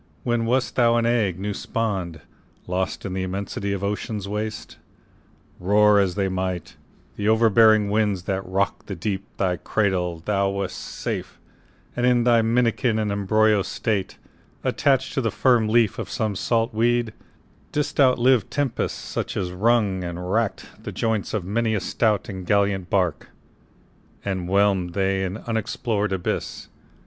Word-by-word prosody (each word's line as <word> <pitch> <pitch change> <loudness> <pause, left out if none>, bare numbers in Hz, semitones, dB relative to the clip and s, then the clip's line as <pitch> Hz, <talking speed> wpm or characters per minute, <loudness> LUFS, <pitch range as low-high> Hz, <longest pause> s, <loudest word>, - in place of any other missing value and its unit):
When 120 -1 0
wast 125 +2 0
thou 120 -2 +4
an 115 0 +2
egg 110 -7 +1
new 100 +2 -3
spawn'd, 95 -9 -3 0.4
Lost 95 +3 -2
in 95 - -4
the 95 - -2
immensity 100 +1 -3
of 100 -1 -3
ocean's 105 0 -3
waste? 105 +1 -5 0.8
Roar 105 +2 +4
as 95 -3 +1
they 100 -1 0
might, 95 -2 -3 0.4
the 105 +1 0
overbearing 110 -1 +5
winds 105 -3 0
That 95 +1 -2
rock'd 95 +2 -2
the 100 - -4
deep, 95 +2 -3
thy 90 -2 0
cradle, 90 -3 -1
thou 100 -2 +1
wast 100 -2 -3
safe - - -5 0.6
And 125 - -2
in 120 -1 +3
thy 120 -1 +4
minikin 115 0 +1
and 105 -2 0
embryo 105 +1 +3
state, 100 0 -2 0.5
Attach'd 135 -2 +1
to 135 - 0
the 115 - 0
firm 120 0 +3
leaf 115 -2 +2
of - - -5
some 110 -3 -2
salt 115 +4 0
weed, 120 0 +1 0.6
Didst 145 0 -2
outlive 130 -4 +4
tempests, 145 -5 -1
such - - -4
as 90 - -2
wrung 100 -1 +1
and 90 +1 -5
rack'd 115 -2 -2
The - - -5
joints 110 -2 -1
of 105 -5 -2
many 110 +3 0
a - - +1
stout 105 +1 0
and 95 -2 -6
gallant 100 -1 +1
bark, 90 -5 0 1.0
And 95 -3 -2
whelm'd 95 -3 +2
them 95 -1 +1
in 95 -1 -2
the - - -8
unexplor'd 110 -2 -1
abyss. 95 -2 -3
105 Hz, 155 wpm, -23 LUFS, 95-115 Hz, 1.0 s, overbearing